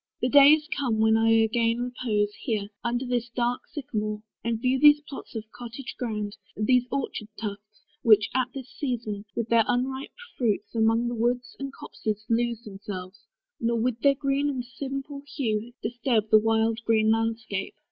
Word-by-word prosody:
The 250 - +1
day 285 +2 +9
is 310 -1 +1
come 250 -6 0
when 220 0 +4
I 225 0 +3
again 230 +1 +3
repose 230 -4 -1
Here, 210 -5 -3
under 240 +2 -1
this 245 -1 -1
dark 240 +1 -1
sycamore, 215 -7 -3 0.2
and 230 -1 -1
view 255 +2 +1
These 295 +1 +7
plots 280 -4 -10
of 220 - -3
cottage 240 +2 -8
ground, 210 -4 -3 0.2
these 245 +3 +3
orchard 270 -5 -3
tufts, 210 0 -7 0.2
Which, 215 -2 +6
at 255 -1 +2
this 265 -2 -7
season, 225 -7 -3
with 230 -1 -2
their 230 -1 +5
unripe 265 +2 -1 0.2
fruits, 215 -4 0
Among 225 +1 +2
the 240 - -2
woods 245 +2 -1
and 275 0 -4
copses 215 -5 -5
lose 235 0 0
themselves, 195 -1 -8 0.3
Nor, 230 0 +1
with 240 0 0
their 280 +2 +4
green 280 +1 0
and 255 -3 -3
simple 275 +3 -6
hue, 225 -3 -1
disturb 230 -2 0
The 215 - +8
wild 225 +1 +1
green 220 -1 +3
landscape. 225 -3 -1
235 Hz, 165 wpm, -26 LUFS, 220-255 Hz, 0.3 s, day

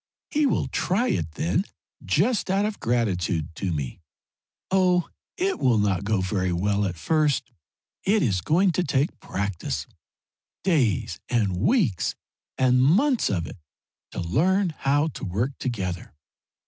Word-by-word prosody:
He 295 -1 +3
will - - +1
try 210 +8 0
it 80 -2 -1
then, 85 +1 0 0.4
just 195 - +1
out 195 +2 +2
of 215 -1 -3
gratitude 90 -9 0
to 95 -2 -2
me. 75 +1 -4 0.7
Oh, 180 -2 +3 0.3
it 380 0 0
will 120 -3 +3
not 100 -3 +1
go 105 -1 +1
very 95 -1 -1
well 100 +4 +1
at 90 -2 -2
first. 150 - +1 0.5
It 210 +1 +3
is 95 -8 +1
going 180 - +3
to 180 +2 0
take 140 0 0
practice 85 -8 -3 0.8
days 125 - +1
and 110 -7 +1
weeks 140 - +1 0.4
and 125 -1 +4
months 220 - +3
of 90 -5 -1
it - - -9 0.5
to - - -6
learn 175 - +1
how 145 +3 +1
to - - -9
work 105 +9 -1
together. 95 -11 -4
120 Hz, 140 wpm, -25 LUFS, -, 0.8 s, and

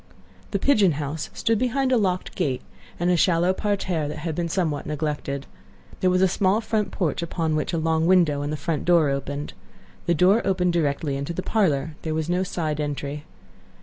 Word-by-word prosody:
The 200 - 0
"pigeon 200 - +4
house" 150 +2 -4
stood 225 -2 0
behind 255 +2 +1
a - - +5
locked 185 -5 0
gate, 140 -8 -1 0.4
and 175 +1 +2
a - - +4
shallow 175 +1 +3
parterre 190 -6 -1
that 145 - -5
had 160 +1 -3
been 170 +1 -2
somewhat 160 -5 -1
neglected. 150 -2 -3 0.5
There 185 - +3
was 185 +1 +3
a - - +6
small 190 +3 +2
front 220 -2 -1
porch, 165 -4 -1
upon 165 -2 -1
which 155 - -1
a 170 - -1
long 160 0 +1
window 170 -6 +4
and 145 +1 -3
the 155 - -2
front 155 0 -2
door 170 -5 +4
opened. 140 +1 -4 0.5
The 170 - +3
door 190 +8 +4
opened 180 -2 +1
directly 145 -3 0
into 140 +5 -4
the 185 - -4
parlor; 155 -8 0
there 155 -1 -2
was 160 +1 -2
no 180 +1 +1
side 160 -5 -2
entry. 145 0 -4
165 Hz, 195 wpm, -24 LUFS, 150-185 Hz, 0.5 s, a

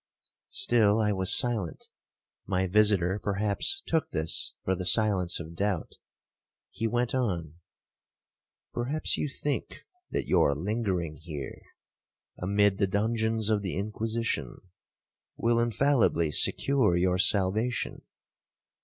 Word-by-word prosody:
Still 110 -3 +2
I 105 -1 +1
was 95 -1 +2
silent;—my 95 -3 -3
visitor 100 -1 +3
perhaps 105 - -1
took 160 -1 -1
this 80 0 -2
for 95 - 0
the 95 0 -4
silence 95 -2 +4
of 85 0 -9
doubt. 95 -2 -3 0.7
He 115 - -3
went 120 +1 -1
on. 85 - -3 1.1
'Perhaps 135 +6 -1
you 150 - -2
think 140 +1 -4 0.3
that - - -3
your 80 -5 +2
lingering 90 -3 -3
here, 75 -5 -8 0.7
amid 100 +1 +1
the 100 - +2
dungeons 110 +2 -1
of 105 -1 +1
the 95 -3 -4
Inquisition, 110 +3 -3 0.8
will 115 0 +1
infallibly 120 - +1
secure 125 - +3
your 90 +1 +1
salvation. 105 +6 0
105 Hz, 110 wpm, -27 LUFS, 90-115 Hz, 1.1 s, silence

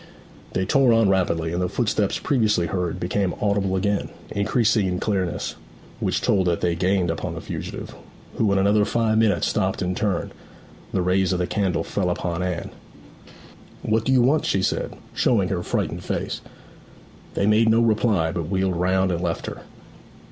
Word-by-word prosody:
They 95 - 0
tore 130 +3 +4
on 115 -3 +4
rapidly, 85 -4 +1
and 90 - -1
the 90 - 0
footsteps 105 -1 0
previously 110 -9 +1
heard 90 -1 -2
became 90 +1 -1
audible 100 -2 +1
again, 100 +2 0 0.2
increasing 105 0 +2
in 90 0 -1
clearness, 95 -5 -2 0.4
which - - 0
told 95 -3 +2
that 85 -1 0
they 85 - +1
gained 90 0 +1
upon 80 - -4
the - - -5
fugitive, - - -6 0.4
who 110 -3 +2
in 100 - +2
another 100 +2 +3
five 110 0 +1
minutes 110 -2 +2
stopped - - 0
and 90 0 -1
turned. 100 -5 -1 0.6
The 95 - 0
rays 95 +1 +2
of - - 0
the 90 - 0
candle 95 -1 0
fell 95 -3 -1
upon 90 0 -2
Anne. 90 -2 -3 1.1
'What 110 0 +1
do 130 - 0
you 130 -2 +5
want?' 145 +5 +2
she 95 - +1
said, - - -1 0.2
showing 100 -7 +2
her 90 -3 -1
frightened - - -2
face. - - -3 0.9
They 100 - +1
made 110 +2 +4
no 110 +1 +4
reply, 110 -7 +2
but 85 -2 -4
wheeled 95 -1 0
round 95 +1 +2
and 85 -1 -2
left 85 -2 -2
her. - - -6
95 Hz, 175 wpm, -23 LUFS, 90-110 Hz, 1.1 s, you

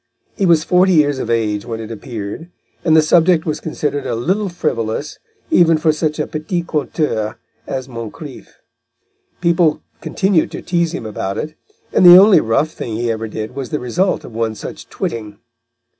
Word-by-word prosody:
He 195 - +1
was 165 -2 +4
forty 185 +2 +3
years 145 -4 +3
of 115 - -4
age 105 -3 0
when 115 -2 -5
it 110 0 -7
appeared, 115 +6 -7 0.3
and 160 -2 +4
the 160 - +6
subject 165 +1 +3
was 155 -1 -2
considered 145 -3 -3
a - - -1
little 190 - -1
frivolous, 140 -6 -3 0.3
even 165 - +5
for 155 0 +2
such 155 0 -1
a - - -1
petit 165 +3 -3
conteur 145 -9 -2 0.3
as 130 -1 -4
Moncrif. 115 -4 -8 0.9
People 170 -3 +2 0.2
continued 190 -4 +1
to - - -6
tease 170 -2 0
him - - -6
about 100 -2 -4
it, 155 - -4 0.4
and - - +4
the 175 0 +11
only 200 +1 +7
rough 115 +8 +1
thing 115 -7 -6
he 120 +1 -1
ever 110 0 -3
did 110 +1 -6
was 135 -3 -5
the 150 - -2
result 180 +10 0
of - - -11
one 115 -1 -2
such - - -9
twitting. 105 -3 -5
150 Hz, 175 wpm, -18 LUFS, 115-170 Hz, 0.9 s, the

